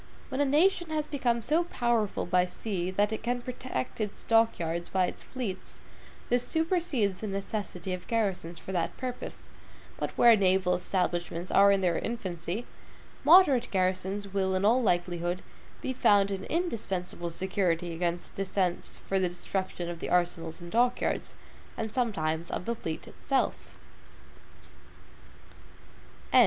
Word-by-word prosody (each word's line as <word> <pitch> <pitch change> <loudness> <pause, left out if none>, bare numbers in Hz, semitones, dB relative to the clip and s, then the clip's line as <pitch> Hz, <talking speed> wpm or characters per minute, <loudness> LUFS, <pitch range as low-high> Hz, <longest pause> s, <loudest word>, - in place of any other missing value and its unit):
When 260 +1 -1
a - - +4
nation 340 +5 +3
has 310 -1 -1
become 245 -6 0
so 315 +8 +2
powerful 235 - 0
by 180 +1 +3
sea 180 -1 -3
that 205 +3 +1
it 220 - -3
can 245 +2 -1
protect 245 - -4
its 210 -1 -4
dock 225 0 +4
yards 170 +1 -3
by 185 -1 +2
its - - -6
fleets, 230 -8 -5 0.5
this 245 0 +1
supersedes 320 - +1
the 215 - -4
necessity 195 -2 -3
of 180 0 -6
garrisons 190 -7 -1
for 190 - -8
that 175 -3 -1
purpose; 250 -1 -5 0.6
but - - -1
where 235 -1 +8
naval 190 -2 +3
establishments 175 -1 -1
are 200 0 +7
in 195 -1 +3
their 175 -3 +2
infancy, 190 -1 -4 0.6
moderate 295 -8 +7
garrisons 190 +1 -1
will, 190 -1 +1
in 185 +2 +1
all 240 +5 +5
likelihood, 175 -3 0 0.4
be 260 - -1
found 200 -5 +4
an 195 -1 -3
indispensable 195 - -2
security 175 -1 -1
against 175 +1 -2
descents 190 -2 -1
for 195 - -1
the 185 -1 +1
destruction 180 0 -3
of 170 -1 -5
the - - -4
arsenals 175 -2 0
and 175 0 -9
dock 245 +2 +3
yards, - - -2 0.4
and 220 -1 -3
sometimes 170 -9 -1
of - - -3
the 235 - 0
fleet 160 -8 -5
itself. 270 -1 -2
195 Hz, 145 wpm, -29 LUFS, 180-235 Hz, 0.6 s, where